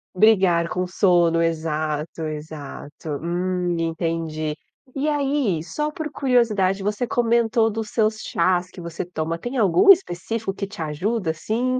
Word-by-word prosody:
Brigar 185 -5 +4
com 180 0 -2
sono, 175 -3 +3
exato, 155 -1 -2
exato. 155 0 -7
Hum, 175 0 -1
entendi. 165 -2 -2 0.4
E 280 +2 -1
aí, 275 - 0
só 300 - -3
por 305 0 -5
curiosidade, 215 -9 +2
você 210 +4 -1
comentou 230 -1 +2
dos 220 0 -4
seus 215 -1 +1
chás 180 +1 +1
que - - -12
você 170 +1 -5
toma, 165 -1 -3
tem 245 +9 -5
algum 360 - +6
específico 225 - 0
que 200 - -4
te 200 -3 -9
ajuda, 170 +4 -1
assim? 240 +10 -1
185 Hz, 135 wpm, -23 LUFS, 165-225 Hz, 0.4 s, algum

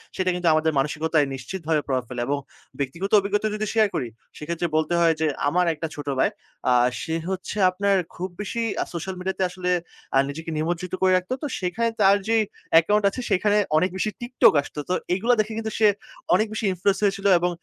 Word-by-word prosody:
সেটা 185 -1 0
কিন্তু 180 -1 -1
আমাদের 155 +1 +2
মানসিকতায় 150 +1 +1
নিশ্চিতভাবে 155 +3 -2
প্রভাব 130 -2 0
ফেলে। 125 -1 -4
এবং 145 +1 0 0.4
ব্যক্তিগত 165 +9 -3
অভিজ্ঞতা 205 +2 0
যদি 215 0 -2
শেয়ার 220 -2 +4
করি 125 - -1 0.3
সেক্ষেত্রে 170 +3 -3
বলতে 155 +2 +1
হয় 165 -1 +4
যে 160 - +3 0.2
আমার 180 +4 +2
একটা 160 +1 -4
ছোট - - -10 0.2
ভাই। - - +3 0.4
আ - - +5 0.3
সে 160 - -2
হচ্ছে 190 +2 -4
আপনার 200 +2 +1 0.2
খুব 185 +2 -4
বেশি 220 +3 -3 0.2
আ - - +2
সোশ্যাল 185 +3 -4
মিডিয়া 190 +1 -2
তে - - +2
আসলে 180 0 -4 0.5
আ - - +6
নিজেকে 160 +3 -6
নিমজ্জিত 170 +3 -2
করে 185 - +4
রাখত। 185 +4 -5
তো 295 - 0
সেখানে 220 +6 0
তার 195 +1 +6
যেই 225 0 +3 0.3
অ্যাকাউন্ট 205 +6 +5
আছে 255 - -6
সেইখানে 205 +2 +2 0.2
অনেক 185 +4 +2
বেশি 215 - 0
TikTok 245 +1 +4
আসতো। 150 - -9
তো - - +2 0.2
এইগুলা 230 +7 +2
দেখে 215 +1 0
কিন্তু 220 -1 -3
সে 215 - +6 0.5
অনেক 215 +4 +2
বেশি 215 0 -2
influence 190 +3 0
হয়েছিল 195 -1 0
এবং 175 +1 +1
185 Hz, 195 wpm, -24 LUFS, 160-205 Hz, 0.5 s, আ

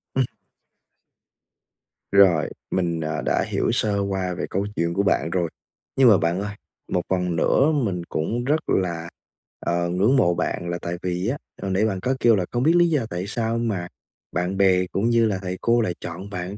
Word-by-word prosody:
Ừm. 130 -1 +3 1.9
Rồi, 95 -6 +5 0.2
mình, 85 -3 0
à, 80 0 -2
đã - - +1
hiểu - - 0
sơ 100 -2 +1
qua 95 -2 -1
về - - -3
câu 100 +2 -1
chuyện 85 0 0
của 100 - +1
bạn 90 -4 +1
rồi. 85 -2 0 0.5
Nhưng 130 -3 +6
mà 100 - +7
bạn 85 +3 0
ơi, 105 0 -5 0.4
một 90 - +1
phần 90 -2 0
nữa 140 - +3
mình 100 - -1
cũng 115 +10 -2
rất 150 +4 +2
là, 85 -3 0 0.5
ờ, 85 0 -1
ngưỡng 100 +9 +2
mộ 90 -9 +4
bạn 85 0 -2
là 85 - -2
tại 85 +1 -4
vì 90 +2 -2
á 135 +4 -1 0.2
hồi 95 - -2
nãy 100 +4 +2
bạn 95 -4 -1
có 130 +7 0
kêu 115 -2 +5
là 90 -3 0
không 120 +1 0
biết 165 +3 +4
lý 175 -1 +5
do 145 -8 +1
tại 90 +3 -4
sao 115 +1 -1
mà 100 -7 -2 0.4
bạn 90 +3 -1
bè 95 -2 +4
cũng 110 +5 +1
như 115 -1 +4
là 100 -3 0
thầy 90 0 -4
cô 120 0 +3
lại 90 -5 0
chọn 90 +4 -7
bạn 95 +1 -5
95 Hz, 205 wpm, -23 LUFS, 90-115 Hz, 1.9 s, mà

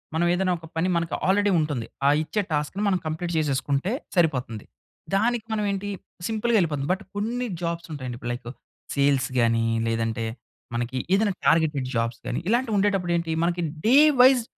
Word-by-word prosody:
మనం 170 +2 +2
ఏదైనా 185 0 +1
ఒక 165 - -13
పని, 165 +3 +1
మనకు 170 -1 -1
ఆల్రెడీ 205 +1 +3
ఉంటుంది, 145 -7 -2 0.2
ఆ - - +7
ఇచ్చే 205 +7 -1
టాస్క్‌ని 150 +7 -1
మనం 185 -2 +2
కంప్లీట్ 170 +2 -3
చేసేసుకుంటే 145 +4 0 0.2
సరిపోతుంది. 125 - 0 0.5
దానికి 230 +2 +1
మనం 210 -1 0
ఏంటి, 200 +1 -3 0.4
సింపుల్‌గా 225 +1 +1
ఎళ్ళిపోది. 145 -4 -1
బట్ 195 +3 -5
కొన్ని 240 +4 -1 0.2
జాబ్స్ 170 0 -3
ఉంటాయండి, 130 -4 -5
ఇప్పుడు 120 - -3
లైకు 120 0 -7 0.4
సేల్స్ 140 -1 +2
గాని, 115 -1 +2 0.2
లేదంటే 115 0 -1 0.5
మనకి 120 +2 -2 0.2
ఏదైనా 205 0 +2
టార్గెటెడ్ 150 -5 +2
జాబ్స్ 115 0 -1
గాని, 125 - -2
ఇలాంటివి 235 -1 +1
ఉండేటప్పుడు 195 -3 +1
ఏంటి, 165 -1 -2
మనకి 175 0 0 0.2
డే 255 - +6 0.2
వైస్ 255 -1 +6
165 Hz, 160 wpm, -25 LUFS, 135-205 Hz, 0.5 s, ఆ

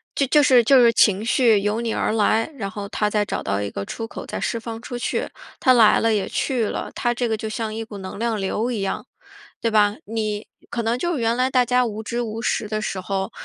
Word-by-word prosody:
就 280 - +2
就 295 +3 +5
是 255 -4 +5
就 260 +2 +6
是 235 -1 +6
情 205 -2 +4
绪 230 -2 +4
由 210 +3 -1
你 230 -1 -2
而 - - 0
来， 220 +1 +2
然 200 -4 -4
后 205 -2 -6
它 210 0 0
再 210 0 +1
找 - - -3
到 100 +1 -1
一 100 - -3
个 100 - -5
出 225 - -5
口 - - -8
再 - - -5
释 - - -1
放 225 0 -6
出 245 0 -6
去， 245 - -2 0.3
它 255 - +5
来 225 -4 +6
了 225 0 +2
也 205 -2 0
去 255 -4 0
了。 - - -4
它 240 - 0
这 240 0 -1
个 220 - 0
就 220 - -5
像 220 0 -4
一 225 - -3
股 220 -2 -9
能 190 0 -7
量 225 0 -1
流 215 +5 -1
一 225 -4 -2
样， 195 - -3 0.5
对 230 - 0
吧？ 210 -1 +3
你 215 -1 -3 0.2
可 235 - -3
能 230 +2 0
就 345 +2 -1
原 230 -1 +1
来 255 +1 +1
大 255 -2 +3
家 250 +1 +3
无 220 -2 -4
知 235 +2 -2
无 225 -1 -4
识 220 - 0
的 215 0 -1
时 205 -3 -3
候， 195 +1 -3
225 Hz, 270 characters per minute, -22 LUFS, 210-240 Hz, 0.5 s, 就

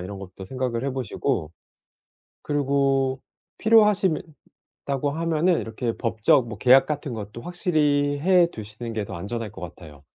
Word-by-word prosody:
이런 95 +2 -7
것도 95 0 -10
생각을 125 +2 -3
해 140 - 0
보시고 120 - -2 0.9
그리고 135 -2 +1 0.4
필요하시면 210 -6 +4 0.6
다고 140 +1 -1
하면은 165 +2 +1
이렇게 115 +1 -3
법적 115 +1 +2
뭐 110 -2 -7
계약 130 +4 +6
같은 145 -3 -4
것도 105 +1 -7
확실히 150 -5 +1
해 180 0 +5
두시는 110 +2 -7
게 110 - -2
더 95 - -7
안전할 105 +4 -5
것 - - -11
같아요. 75 -4 -11
130 Hz, 305 characters per minute, -24 LUFS, 110-150 Hz, 0.9 s, 계약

